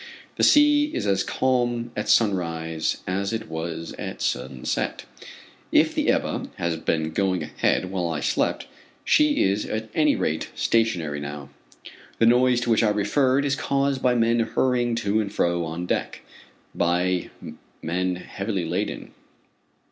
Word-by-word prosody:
The - - -1
sea 295 0 +6
is - - -2
as 100 -1 +1
calm 120 -2 0
at 105 - -3
sunrise 85 -6 0
as 100 +2 -2
it 115 -1 -4
was 80 +1 -5
at - - -6
sunset. 65 +1 -2 0.7
If - - +4
the - - 0
Ebba - - 0
has 85 -1 -1
been 80 0 -1
going 95 +1 0
ahead 90 - 0
while 90 -3 -1
I 80 -2 -2
slept, - - 0 0.4
she 300 -1 +4
is 100 +2 +1
at 110 0 -4
any 150 -2 +3
rate, 80 +1 -2
stationary 90 -11 0
now. 70 -1 -7 0.7
The 115 - +3
noise 125 +1 +4
to 120 - 0
which 110 - +4
I 110 - +3
referred, 130 +6 +2
is 140 -1 +1
caused 140 -2 0
by 125 -1 +3
men 115 0 +2
hurrying 120 +1 +1
to 105 +2 +2
and 100 -2 -4
fro 85 -3 0
on 80 +2 -4
deck - - -2 0.5
by 90 +1 0 0.5
men 90 +2 -1
heavily 95 0 -4
laden. 90 +6 -3
100 Hz, 150 wpm, -24 LUFS, 85-120 Hz, 0.7 s, sea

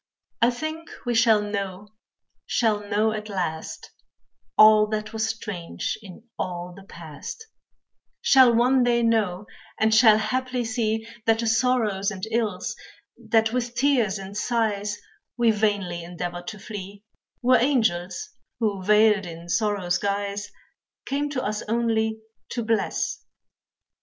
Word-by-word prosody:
I 235 - +6
think 315 +6 -5 0.2
we 245 - 0
shall 225 -2 +4
know, 200 -1 -4 0.6
shall 220 -3 +1
know 210 +1 0
at 215 0 -5
last, 175 -5 -4 0.7
All 215 0 +7
that 215 0 -4
was 220 0 -1
strange 205 -6 -4
in 195 0 -12 0.2
all 175 0 -4
the 195 0 -13
past, 170 - -9 0.7
Shall 260 -3 +6
one 250 +3 +3
day 240 -1 +2
know, 210 -4 +1 0.3
and 220 0 +3
shall 220 -1 +7
haply 250 +3 -1
see 225 -2 -1 0.2
That 225 0 +4
the 230 - -2
sorrows 225 -4 +1
and 190 -3 -8
ills, 210 -3 -1 0.4
that 225 -1 +1
with 245 -1 -2
tears 245 -6 +2
and 195 +1 -8
sighs, 210 -3 -1 0.4
We 235 -2 +4
vainly 205 -5 -1
endeavored 175 0 -6
to 215 - -6
flee, 200 -1 -8 0.4
Were 255 +1 +6
angels 230 - 0 0.3
who, 205 -5 -1
veiled 210 -1 +4
in 170 0 -9
sorrow's 195 -4 0
guise 200 0 -2 0.6
Came 285 +2 -1
to 270 -3 -3
us 210 0 -2
only 220 -1 0 0.3
to 235 - -3
bless. 220 -2 -1
215 Hz, 130 wpm, -24 LUFS, 200-235 Hz, 0.7 s, All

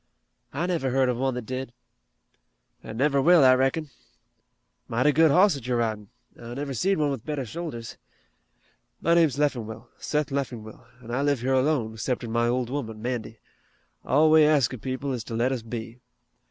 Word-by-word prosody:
"I 150 +6 -2
never 170 -7 -1
heard 130 0 +2
of 125 - -1
one 130 0 -1
that 125 -2 -5
did." 130 +1 -5 1.1
"An' 110 - -8
never 140 +1 +2
will, 170 +1 +6
I 130 -1 +7
reckon. 135 +3 0 1.0
Mighty 125 +6 +2
good 160 +2 +5
hoss 185 +7 +5
that 135 -4 -7
you're 125 -1 +1
ridin'. 110 -3 -2 0.3
I 120 +1 -8
never 140 0 -4
seed 190 - +1
one 150 -2 +1
with 130 -5 -5
better 150 -4 -3
shoulders. 130 -4 -7 1.0
My 170 - +2
name's 160 -6 +3
Leffingwell, 120 -7 -2
Seth 150 -1 -1
Leffingwell, 120 -5 -5 0.2
an' 115 - -9
I 125 +3 0
live 140 -3 +1
here 130 +2 0
alone, 130 -5 +1
'ceptin' 120 0 -3
my 120 +1 +1
old 125 0 -1
woman, 115 -6 -4
Mandy. 115 -1 -4 0.7
All 155 +4 +3
we 155 0 +7
ask 150 -5 +3
of 125 - -8
people 130 +3 -3
is 120 -3 -4
to 115 - -5
let 120 +3 +1
us 130 -3 -2
be. 115 +1 -7
130 Hz, 180 wpm, -26 LUFS, 120-145 Hz, 1.1 s, I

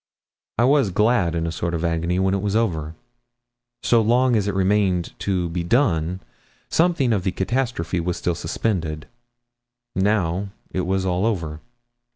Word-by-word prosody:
I 120 - +3
was 135 -3 +4
glad 105 -3 +2
in 85 0 -1
a 85 - -2
sort 85 +1 -2
of 85 +1 -2
agony 85 +1 0
when 95 0 +2
it 100 - 0
was 100 0 -1
over. 80 -9 0 0.9
So 120 -1 +4
long 120 +3 +3
as 105 -2 +1
it 100 - -1
remained 95 -2 +1
to 90 -3 0
be 85 +1 -2
done, 90 - +1 0.5
something 165 -8 +2
of 100 -4 0
the 95 - 0
catastrophe 95 -5 -1
was 85 +1 -2
still 90 - -1
suspended. 80 -2 -2 0.9
Now 95 -1 +1 0.2
it 90 -1 -2
was 95 0 0
all 90 0 0
over. 80 -9 -2
95 Hz, 160 wpm, -22 LUFS, 85-110 Hz, 0.9 s, was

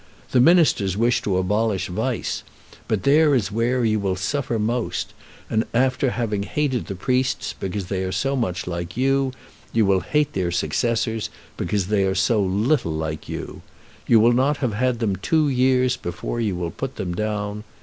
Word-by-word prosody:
The 130 - +4
ministers 145 - +4
wish 120 +2 +2
to 95 -3 0
abolish 100 0 0
vice, 110 +7 -2 0.5
but 105 -4 -1
there 150 +1 +5
is 105 -6 0
where 120 +3 +1
you 110 -1 +2
will 95 -2 0
suffer 120 +6 -1
most, 110 -5 -2 0.3
and 110 0 +1
after 130 +2 +2
having 110 -5 -2
hated 130 +3 -1
the 95 - -4
priests 130 +6 0
because 95 0 -4
they 95 +1 -2
are 95 - -2
so 135 +7 0
much 110 -9 -2
like 85 +2 -5
you, 135 +1 +2 0.4
you 115 -2 +3
will 95 -1 +3
hate 150 +7 0
their 90 -2 0
successors 115 +4 -1 0.3
because 100 -3 -1
they 100 0 +1
are 95 0 0
so 105 +3 +2
little 100 - +1
like 80 0 -4
you. - - -6 0.5
You 115 - +6
will 115 +2 +5
not 135 +4 +2
have 125 -7 -1
had 125 +3 +1
them 105 -5 -1
two 155 - +2
years 130 -1 +2
before 90 +7 -4
you 105 -5 0
will 85 -1 -3
put - - -5
them 90 -2 -3
down. 105 +1 -3
110 Hz, 180 wpm, -23 LUFS, 95-130 Hz, 0.5 s, You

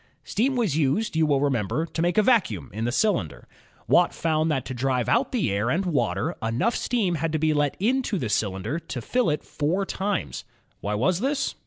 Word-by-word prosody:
Steam 260 +5 0
was 220 - +1
used, 160 +8 +1
you 160 -1 +3
will 140 -2 +2
remember, 140 +2 0
to 165 - -4
make 175 +3 +1
a 215 - +6
vacuum 185 - +1
in 110 +2 -3
the 120 - 0
cylinder. 170 - 0 0.4
Watt - - +4
found 160 -1 +1
that 135 -4 -1
to - - -5
drive 125 0 0
out 250 +3 +2
the 220 - 0
air 100 +4 0
and 175 +7 0
water, 145 - 0
enough 115 - 0
steam 220 -8 0
had 165 0 -1
to - - +2
be 155 0 +2
let 145 -1 0
into 245 +1 +1
the 125 - -2
cylinder 105 - -1
to 135 - -6
fill 245 - 0
it 150 -1 -1
four 170 +7 -1
times. 195 +1 -3 0.4
Why 105 +1 -2
was 165 - +1
this? 275 +3 -1
155 Hz, 205 wpm, -25 LUFS, 125-205 Hz, 0.4 s, a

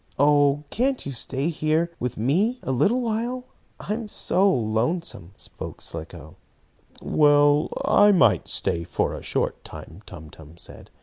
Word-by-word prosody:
"Oh, 145 0 +3
can't 260 +2 -1
you 140 - -4
stay 135 +4 -2
here 160 +1 0
with 125 -1 -4
me 180 - +1
a - - -2
little 210 - +2
while? 240 +2 -3 0.3
I 210 - -3
am 225 0 -5
so 195 -1 +2
lonesome!" 110 - -2
spoke - - -9
Slicko. - - -7 0.7
"Well, 145 0 +3 0.2
I 205 0 +5
might 185 - +3
stay 85 - -1
a - - -1
short - - -2
time," 85 +6 -11
Tum 75 0 -11
Tum 80 +1 -15
said. - - -13
150 Hz, 140 wpm, -24 LUFS, 125-205 Hz, 0.7 s, I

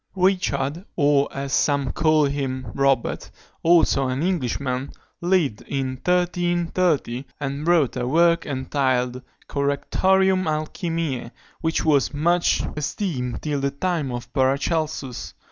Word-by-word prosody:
Richard, 180 -5 +1
or, 145 -2 +3
as 135 -1 -4
some 140 -3 +2
call 155 -2 +3
him, 130 -4 -3
Robert, 135 -3 +1 0.3
also 165 -5 +4
an 130 +4 -1
Englishman, 135 -6 -1 0.3
lived 170 - +1
in 135 -1 -1
1330, 175 -2 0
and 140 +2 -4
wrote 165 -8 +3
a 125 - -2
work 170 +4 +3
entitled 130 -2 0 0.3
Correctorium 185 +7 +2
Alchymiæ, 155 -4 -2 0.3
which 160 -1 0
was 145 -1 +2
much 170 +4 +2
esteemed 145 - -3
till 150 -2 -1
the 140 0 0
time 150 -1 -2
of 120 0 -6
Paracelsus. 140 0 -1
145 Hz, 110 wpm, -23 LUFS, 135-170 Hz, 0.3 s, also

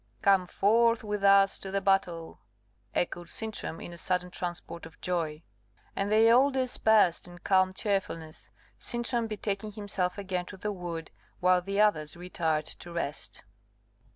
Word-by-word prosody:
"Come 195 -2 +4
forth 230 +5 +3
with 210 -1 -3
us 195 0 +5
to 195 - -6
the 195 +1 0
battle," 190 -4 0 0.6
echoed 175 -1 -2
Sintram 220 -6 -4
in 175 - -8
a 170 - -10
sudden 180 0 -1
transport 170 -2 -5
of 165 - -19
joy. 165 -3 -2 0.5
And 200 +1 -1
they 220 +1 +6
all 260 +4 +6
dispersed 220 -9 +2
in 175 0 -12
calm 185 +1 +3
cheerfulness; 190 -5 -3 0.3
Sintram 240 -1 -1
betaking 210 -1 -3
himself 195 -3 -2
again 185 -3 -3
to 195 - -9
the 210 +3 -3
wood, 170 -4 -6 0.3
while 180 0 +4
the 195 +2 -3
others 170 -7 +2
retired 160 -3 -1
to 175 - -9
rest. 170 -4 -5
190 Hz, 150 wpm, -29 LUFS, 175-210 Hz, 0.6 s, they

